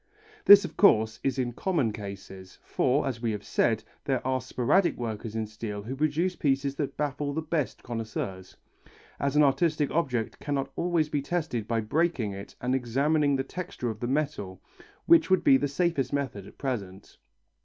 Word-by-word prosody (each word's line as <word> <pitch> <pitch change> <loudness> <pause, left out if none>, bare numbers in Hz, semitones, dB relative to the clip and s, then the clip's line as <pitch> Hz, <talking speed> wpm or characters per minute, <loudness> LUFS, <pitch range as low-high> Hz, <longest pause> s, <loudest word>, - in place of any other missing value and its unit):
This, 205 0 +9
of - - -8
course, 110 - +4
is 135 0 0
in 125 -2 -1
common 145 - 0
cases, 95 -2 -9
for, 135 +4 +1
as 120 -4 -4
we 115 - 0
have 105 -1 -5
said, 110 -2 +1 0.2
there 130 -3 -1
are 130 0 0
sporadic 130 +9 +1
workers 110 -2 -5
in 110 -1 -1
steel 105 -1 -6
who 125 +5 -5
produce 155 +5 0
pieces 140 -1 0
that 145 - -3
baffle 145 0 -2
the 160 - -1
best 155 -3 -2
connoisseurs 110 -5 -5 0.6
as 140 0 -1
an 150 - +6
artistic 150 +1 +2
object 130 -9 -1
cannot 140 -2 -2
always 170 -3 +1
be 145 -1 -1
tested 140 -8 -2
by 115 -1 0
breaking 130 -2 0
it 100 +1 -9
and 125 +1 -1
examining 140 +4 +1
the 135 - 0
texture 175 -6 -5
of 105 - -9
the 120 - -3
metal, 130 -10 -2 0.5
which 335 -8 +5
would 185 -1 +3
be 135 - +6
the 145 +2 +2
safest 145 -3 0
method 130 -9 -3
at - - -15
present. 100 -8 -5
135 Hz, 175 wpm, -28 LUFS, 110-150 Hz, 0.6 s, This